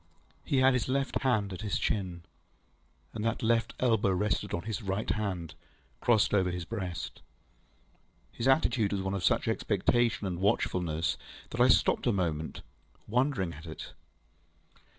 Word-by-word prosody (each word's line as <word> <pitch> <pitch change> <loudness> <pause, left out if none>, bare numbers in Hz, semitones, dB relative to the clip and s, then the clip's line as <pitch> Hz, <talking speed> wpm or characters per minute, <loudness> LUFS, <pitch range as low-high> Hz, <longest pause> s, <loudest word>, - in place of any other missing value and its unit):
He 140 - 0
had 130 0 +6
his 125 0 0
left 135 +1 0
hand 110 -7 +1
at 90 - -6
his 105 -3 -1
chin, 90 -5 -2 0.9
and 110 - -4
that 115 0 -1
left 115 0 +1
elbow 115 -5 +3
rested 95 +1 0
on 85 - -2
his 110 0 -4
right 100 +1 -2
hand, 95 -6 -2 0.5
crossed 110 -4 +3
over 95 -3 +3
his 90 -1 -4
breast. 90 -5 -5 1.1
His 115 - -2
attitude 125 -7 +3
was 95 -1 -1
one 95 0 -2
of 100 -2 -2
such - - +2
expectation 115 0 +1
and 90 -2 -3
watchfulness 90 -5 0 0.3
that 120 - -1
I 125 - +7
stopped 130 - +3
a - - +5
moment, 80 -6 -2 0.5
wondering 125 -7 +1
at 80 +2 -11
it. 80 - -8
105 Hz, 150 wpm, -30 LUFS, 90-115 Hz, 1.1 s, I